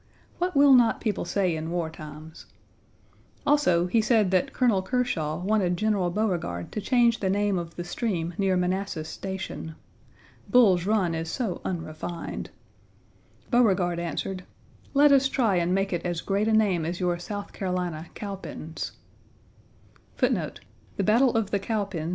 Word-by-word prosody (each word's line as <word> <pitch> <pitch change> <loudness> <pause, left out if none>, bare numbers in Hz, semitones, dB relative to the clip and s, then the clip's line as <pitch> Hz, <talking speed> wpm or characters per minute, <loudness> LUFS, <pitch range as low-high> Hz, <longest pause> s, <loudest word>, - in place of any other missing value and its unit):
What 360 -1 -1
will 280 -1 +7
not 240 -3 +5
people 210 -6 -2
say 185 -2 0
in 160 +1 -4
war 170 -2 -2
times! 155 0 -11 1.0
Also, 280 -13 +3
he 220 +5 +2
said 215 -3 +3
that 190 +9 +2
Colonel 235 -9 +2
Kershaw 190 -9 -1
wanted 185 -1 +1
General 210 -4 +1
Beauregard 175 - -2
to 215 - -3
change 235 +1 +3
the 190 - 0
name 200 -1 +1
of 170 -1 -7
the 175 - -4
stream 175 -2 -2
near 190 -2 +2
Manassas 180 -3 -2
Station. 190 -3 -6 0.7
Bull's 195 -8 +5
Run 200 -6 +2
is 165 0 -3
so 220 -4 -3
unrefined. 165 -1 -5 1.0
Beauregard 190 -8 +3
answered: 180 +2 -3 0.5
"Let 290 +1 +6
us 270 -1 +5
try 230 -8 +1
and 175 0 +1
make 195 +1 0
it 170 - -2
as 175 -1 -2
great 200 +2 0
a - - +2
name 200 -6 +3
as 170 +3 -3
your 175 -2 0
South 205 +3 -6
Carolina 180 -4 -3
Cowpens." 195 -5 -6
185 Hz, 135 wpm, -26 LUFS, 170-215 Hz, 1.0 s, will